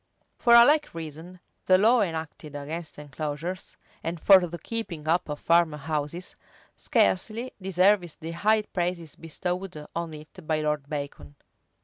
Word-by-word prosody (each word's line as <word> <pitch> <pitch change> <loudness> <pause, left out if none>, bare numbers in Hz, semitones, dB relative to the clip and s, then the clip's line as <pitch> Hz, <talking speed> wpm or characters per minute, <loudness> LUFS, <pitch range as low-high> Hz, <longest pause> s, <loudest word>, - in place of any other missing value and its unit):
For 235 -1 +5
a 235 0 +10
like 295 - +2
reason, 165 +3 -8 0.3
the 185 - +6
law 230 +5 +4
enacted 160 -4 -4
against 155 +3 -6
enclosures, 150 +5 -5 0.3
and 165 +1 -3
for 185 +1 +6
the 170 +1 -7
keeping 175 -8 -5
up 165 0 +1
of 150 - -4
farm 170 -2 +3
houses,[v] 150 +3 -4 0.4
scarcely 215 - +1
deserves 185 -2 +2
the 165 +1 -7
high 215 +5 +2
praises 175 -5 -3
bestowed 175 0 -5
on 165 -2 -3
it 155 +3 -13
by 155 -1 +1
Lord 150 -2 -2
Bacon. 140 - -6
165 Hz, 140 wpm, -26 LUFS, 150-185 Hz, 0.4 s, a